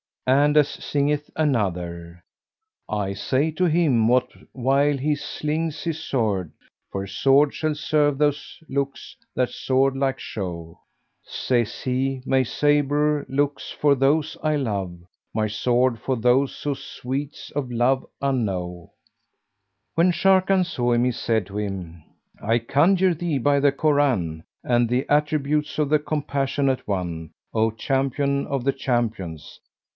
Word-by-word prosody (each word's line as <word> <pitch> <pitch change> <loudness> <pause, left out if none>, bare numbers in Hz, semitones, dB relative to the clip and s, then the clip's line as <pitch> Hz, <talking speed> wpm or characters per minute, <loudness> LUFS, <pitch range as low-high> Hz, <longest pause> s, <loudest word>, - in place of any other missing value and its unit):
And 145 +3 +4
as 150 -2 +6
singeth 145 +1 -1
another, 90 - -2 0.7
"I 100 -2 -1
say 130 +10 0
to 180 +4 0
him, 150 -9 +3
what 125 +1 +3 0.2
while 135 +3 +2
he 150 +3 0
slings 150 +1 -3
his 165 -2 -2
sword, 105 - -1 0.2
* - - -57
'For 95 0 -3
sword 135 +9 +3
shall 155 -1 -1
serve 150 -3 +1
those 145 +2 -1
looks 140 0 -3 0.2
that 125 -1 +1
sword 135 +1 +1
like 135 -1 0
show!' 85 -4 -6 0.4
Says 120 -4 -1
he, 130 0 -1
'My 135 -1 +3
sabre 145 +2 +1
looks 140 +1 -1
for 145 -1 +3
those 145 +3 +1
I 155 -1 +1
love, 100 -10 -2 0.2
* - - -57
My 110 -1 +1
sword 120 +2 +1
for 130 +3 -1
those 125 +3 +1
who 145 - 0
sweets 135 +1 -6
of 140 -3 -3
love 125 +3 +2 0.2
unknow!'" 95 - -2 1.1
When 170 +2 +4
Sharrkan 190 +1 +3
saw 120 -7 0
him, 120 0 +2
he 125 - +2
said 110 -3 -1
to 100 +1 -7
him, 90 -6 -5 0.4
"I 115 +3 +2
conjure 175 +10 +3
thee 165 -2 -2
by 140 +2 +2
the 140 0 +4
Koran 130 - +1 0.2
and 120 -1 +2
the 125 +2 +1
attributes 150 0 +1
of 150 -2 +1
the 155 0 +4
Compassionate 140 -2 -1
One, 85 -5 -3 0.2
O 110 0 +2
Champion 135 +4 -1
of 140 -4 -2
the 135 +1 +1
Champions! 110 - -3
135 Hz, 140 wpm, -23 LUFS, 115-145 Hz, 1.1 s, as